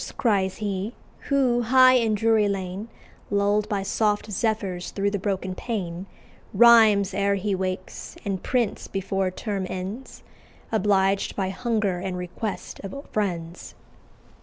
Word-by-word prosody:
cries 195 Hz, -5 st, +1 dB
he, 205 Hz, +1 st, -3 dB, 0.4 s
who, 260 Hz, -4 st, +3 dB
high 255 Hz, +2 st, +6 dB
in 230 Hz, -4 st, +3 dB
Drury 220 Hz, 0 st, +3 dB
Lane, 195 Hz, +2 st, -4 dB, 0.4 s
Lull'd 205 Hz, +1 st, +1 dB
by 200 Hz, -2 st, -1 dB
soft 210 Hz, +1 st, 0 dB
zephyrs 195 Hz, -4 st, -1 dB
through 200 Hz, 0 st, -1 dB
the 205 Hz, -, -2 dB
broken 190 Hz, -1 st, -2 dB
pane, 185 Hz, -4 st, -4 dB, 0.5 s
Rhymes 215 Hz, -3 st, +6 dB
ere 200 Hz, +1 st, +1 dB
he 200 Hz, +1 st, -1 dB
wakes, 185 Hz, -, -4 dB
and 195 Hz, -2 st, -2 dB
prints 245 Hz, -5 st, -1 dB
before 195 Hz, -1 st, -1 dB
Term 195 Hz, 0 st, -4 dB
ends, 195 Hz, +8 st, -6 dB, 0.5 s
Obliged 195 Hz, -2 st, +2 dB
by 190 Hz, -2 st, -1 dB
hunger 210 Hz, -3 st, -1 dB
and 180 Hz, 0 st, -4 dB
request 180 Hz, +4 st, -5 dB
of 195 Hz, +3 st, -7 dB, 0.2 s
friends." 175 Hz, -5 st, -3 dB
200 Hz, 130 wpm, -25 LUFS, 190-220 Hz, 0.5 s, high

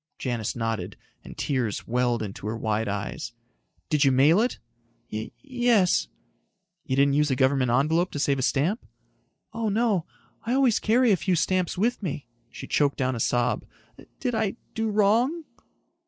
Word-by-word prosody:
Janis 120 Hz, -5 st, -3 dB
nodded, 115 Hz, -2 st, -3 dB, 0.3 s
and -, -, -11 dB
tears 130 Hz, -7 st, -1 dB
welled 120 Hz, -1 st, +1 dB
into 100 Hz, 0 st, -6 dB
her 110 Hz, +1 st, -2 dB
wide 110 Hz, 0 st, -1 dB
eyes. 100 Hz, +3 st, -4 dB, 0.6 s
"Did 150 Hz, -1 st, +3 dB
you 135 Hz, -, +5 dB
mail 145 Hz, +9 st, +5 dB
it?" 245 Hz, -, 0 dB, 0.6 s
"Y... 110 Hz, +1 st, -4 dB
yes." 240 Hz, -8 st, +2 dB, 0.8 s
"You 130 Hz, -, -1 dB
didn't 140 Hz, +1 st, +3 dB
use 150 Hz, +1 st, +2 dB
a 130 Hz, -, +1 dB
government 130 Hz, -1 st, +2 dB
envelope 155 Hz, +8 st, +2 dB
to -, -, -3 dB
save 140 Hz, -1 st, +1 dB
a -, -, 0 dB
stamp?" 155 Hz, -, 0 dB, 0.7 s
"Oh, 225 Hz, -1 st, -1 dB
no. 205 Hz, -5 st, +1 dB, 0.4 s
I 235 Hz, -, -1 dB
always 260 Hz, -4 st, +3 dB
carry 235 Hz, +2 st, +3 dB
a -, -, +6 dB
few 175 Hz, +2 st, 0 dB
stamps 185 Hz, +2 st, 0 dB
with 230 Hz, +6 st, 0 dB
me." 150 Hz, -, -4 dB, 0.2 s
She -, -, -9 dB
choked 145 Hz, -2 st, +1 dB
down 130 Hz, -1 st, 0 dB
a -, -, -4 dB
sob. 120 Hz, +2 st, +1 dB, 0.6 s
"Did 250 Hz, -3 st, -1 dB
I 220 Hz, -2 st, 0 dB, 0.2 s
do 225 Hz, 0 st, -1 dB
wrong?" 225 Hz, +10 st, +2 dB
150 Hz, 165 wpm, -26 LUFS, -, 0.8 s, a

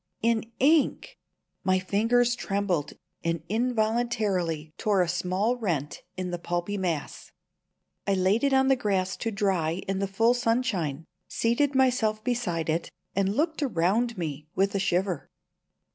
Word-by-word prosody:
In 230 Hz, -1 st, +2 dB
ink! 300 Hz, +3 st, +2 dB, 0.4 s
My 185 Hz, 0 st, +3 dB
fingers 230 Hz, +6 st, +2 dB
trembled 195 Hz, -8 st, -1 dB, 0.3 s
and 165 Hz, -1 st, -1 dB
involuntarily 215 Hz, -8 st, 0 dB
tore 200 Hz, -4 st, +3 dB
a -, -, -2 dB
small 185 Hz, +7 st, 0 dB
rent 165 Hz, -, -2 dB, 0.2 s
in 185 Hz, -1 st, -3 dB
the 175 Hz, -, -3 dB
pulpy 175 Hz, +4 st, -2 dB
mass. 175 Hz, -6 st, -3 dB, 0.8 s
I 200 Hz, -, +3 dB
laid 190 Hz, +5 st, +2 dB
it 280 Hz, -, +3 dB
on 265 Hz, 0 st, +4 dB
the 270 Hz, -, +5 dB
grass 190 Hz, -5 st, 0 dB
to 230 Hz, -, -2 dB
dry 190 Hz, -5 st, 0 dB
in 195 Hz, 0 st, -1 dB
the 195 Hz, -, 0 dB
full 225 Hz, +5 st, +3 dB
sunshine, 230 Hz, -, 0 dB, 0.2 s
seated 265 Hz, +5 st, +1 dB
myself 245 Hz, -5 st, +2 dB
beside 210 Hz, -10 st, -1 dB
it, 165 Hz, +1 st, -1 dB, 0.3 s
and 195 Hz, +1 st, +1 dB
looked 315 Hz, +3 st, 0 dB
around 225 Hz, -, +1 dB
me 150 Hz, -3 st, -4 dB
with 195 Hz, +1 st, +2 dB
a 200 Hz, -, 0 dB
shiver. 185 Hz, -3 st, 0 dB
200 Hz, 145 wpm, -27 LUFS, 180-235 Hz, 0.8 s, the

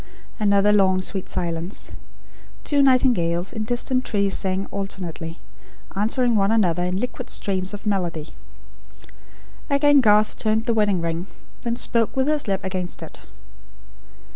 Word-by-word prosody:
Another 205 Hz, 0 st, +4 dB
long 190 Hz, -2 st, +4 dB
sweet 190 Hz, 0 st, -4 dB
silence. 170 Hz, +1 st, -3 dB, 0.7 s
Two 285 Hz, -1 st, +2 dB
nightingales, 225 Hz, -10 st, +2 dB
in 220 Hz, -2 st, -3 dB
distant 255 Hz, +2 st, 0 dB
trees, 200 Hz, -4 st, 0 dB
sang 190 Hz, 0 st, -1 dB
alternately; 180 Hz, -4 st, -4 dB, 0.6 s
answering 230 Hz, +4 st, +2 dB
one 200 Hz, -1 st, +3 dB
another 180 Hz, -6 st, +2 dB
in 180 Hz, +1 st, -1 dB
liquid 250 Hz, +2 st, -5 dB
streams 190 Hz, -2 st, -1 dB
of 205 Hz, +1 st, -8 dB
melody. 175 Hz, -6 st, -1 dB, 1.4 s
Again 285 Hz, 0 st, +5 dB
Garth 210 Hz, -2 st, +4 dB
turned 220 Hz, +1 st, 0 dB
the 235 Hz, -, +1 dB
wedding 205 Hz, -5 st, +2 dB
ring; 165 Hz, +2 st, -3 dB, 0.3 s
then 235 Hz, -1 st, -2 dB
spoke, 230 Hz, -2 st, 0 dB
with 265 Hz, +1 st, +1 dB
his 300 Hz, -4 st, +1 dB
lips 195 Hz, -1 st, -1 dB
against 185 Hz, -2 st, -4 dB
it. -, -, -12 dB
200 Hz, 135 wpm, -23 LUFS, 185-235 Hz, 1.4 s, Again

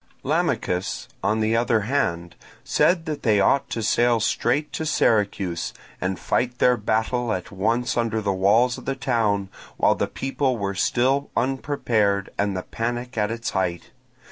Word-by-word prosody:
Lamachus, 90 Hz, +1 st, -1 dB, 0.2 s
on 110 Hz, +1 st, +1 dB
the 110 Hz, +1 st, +2 dB
other 115 Hz, -1 st, +2 dB
hand, 90 Hz, -8 st, -1 dB, 0.3 s
said 170 Hz, -2 st, +2 dB
that 150 Hz, -3 st, -4 dB
they 105 Hz, -4 st, +3 dB
ought 140 Hz, +8 st, +2 dB
to 115 Hz, -, -3 dB
sail 120 Hz, +2 st, +3 dB
straight 120 Hz, +6 st, 0 dB
to -, -, -3 dB
Syracuse, 100 Hz, -, 0 dB, 0.3 s
and 95 Hz, 0 st, -1 dB
fight 125 Hz, 0 st, -1 dB
their 125 Hz, 0 st, +4 dB
battle 110 Hz, +2 st, 0 dB
at 90 Hz, -4 st, -3 dB
once 115 Hz, +6 st, 0 dB
under 115 Hz, -2 st, 0 dB
the 100 Hz, -2 st, 0 dB
walls 110 Hz, +6 st, +3 dB
of -, -, -14 dB
the 135 Hz, -, -1 dB
town 115 Hz, -7 st, 0 dB, 0.3 s
while -, -, +4 dB
the -, -, -1 dB
people 135 Hz, -1 st, -1 dB
were 100 Hz, -2 st, -2 dB
still 130 Hz, +8 st, +1 dB
unprepared, 115 Hz, -6 st, 0 dB
and 100 Hz, -2 st, 0 dB
the 90 Hz, -, -4 dB
panic 120 Hz, +2 st, -4 dB
at 105 Hz, -2 st, 0 dB
its 115 Hz, +1 st, -3 dB
height. 90 Hz, -3 st, -2 dB
115 Hz, 160 wpm, -23 LUFS, 100-125 Hz, 0.3 s, their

